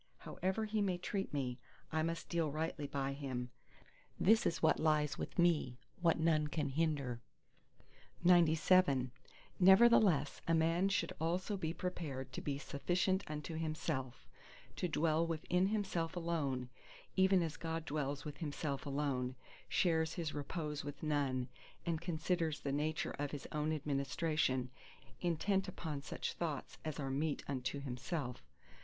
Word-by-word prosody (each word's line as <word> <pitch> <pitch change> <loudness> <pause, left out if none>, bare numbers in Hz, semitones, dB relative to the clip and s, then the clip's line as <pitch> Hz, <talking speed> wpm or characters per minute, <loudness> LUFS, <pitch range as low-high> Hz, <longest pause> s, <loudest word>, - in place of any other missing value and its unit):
However 190 +5 -2
he 215 0 0
may 190 -3 +1
treat 195 +2 -3
me, 130 -3 -2 0.3
I 160 -1 +1
must 165 +1 -2
deal 165 -3 0
rightly 155 0 -2
by 140 -1 -2
him. 130 -3 -4 0.7
This 220 +4 +5
is 165 - -2
what 160 - +4
lies 150 -2 +2
with - - -5
me, 165 -8 +3 0.2
what 165 -2 +3
none 160 -2 +3
can 150 -1 -1
hinder. 140 -5 0 1.0
XCVIII 165 -5 +5 0.5
Nevertheless 190 -6 +6
a 165 - +4
man 165 +4 +3
should 195 - 0
also 180 +5 0
be 160 -5 -2
prepared 150 -8 -4
to - - -4
be 140 -2 -2
sufficient 180 +7 0
unto 150 +2 -4
himself—to 155 0 -4
dwell 160 0 +2
with 160 -2 -3
himself 185 -3 +1
alone, 145 -8 -1 0.5
even 190 -1 +5
as 160 -2 -3
God 165 -1 -3
dwells 145 -2 -2
with 150 - -6
Himself 145 -3 -3
alone, 135 -3 -1 0.3
shares 160 -3 +2
His 165 -4 -2
repose 150 0 -3
with 145 +1 -7
none, 140 -4 0 0.4
and 165 -2 -1
considers 170 -2 -1
the 140 - -2
nature 150 +2 0
of 145 0 -1
His 145 -1 -6
own 150 +1 0
administration, 140 -2 0 0.5
intent 190 +3 +1
upon 155 -6 -4
such 140 - -4
thoughts 155 -6 -4
as 155 -1 -4
are 135 -2 -2
meet 145 +2 -1
unto 140 +1 -2
Himself. 130 0 -4
155 Hz, 140 wpm, -36 LUFS, 140-170 Hz, 1.0 s, Nevertheless